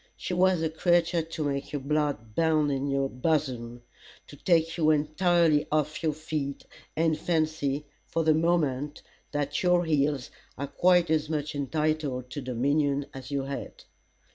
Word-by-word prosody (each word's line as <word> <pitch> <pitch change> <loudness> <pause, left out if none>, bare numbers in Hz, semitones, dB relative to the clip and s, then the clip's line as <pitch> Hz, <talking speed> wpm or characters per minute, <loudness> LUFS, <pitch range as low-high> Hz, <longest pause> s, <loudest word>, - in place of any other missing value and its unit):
She - - -4
was 180 -1 +3
a 160 - +1
creature 170 +1 +2
to 160 0 -5
make 140 -1 -2
your 145 - -2
blood 140 -6 -1
bound 155 0 +2
in 135 0 -1
your 140 -1 +1
bosom, 125 -4 -2 0.4
to - - -13
take 165 +1 +2
you 160 -3 +2
entirely 155 +1 +3
off 155 0 0
your 160 -2 +1
feet, 150 -3 -4 0.3
and 160 0 +2
fancy, 155 -3 -1 0.2
for 165 - -1
the 160 0 +4
moment, 150 -4 0 0.3
that 145 -1 -1
your 180 -1 +3
heels 145 -4 0 0.3
are 140 - -2
quite 175 +3 +3
as 155 -1 +1
much 150 -1 -2
entitled 145 -3 -1
to 145 - -4
dominion 140 +3 0
as 130 -1 -9
your 140 -2 -2
head. 140 0 -6
150 Hz, 155 wpm, -28 LUFS, 140-160 Hz, 0.4 s, the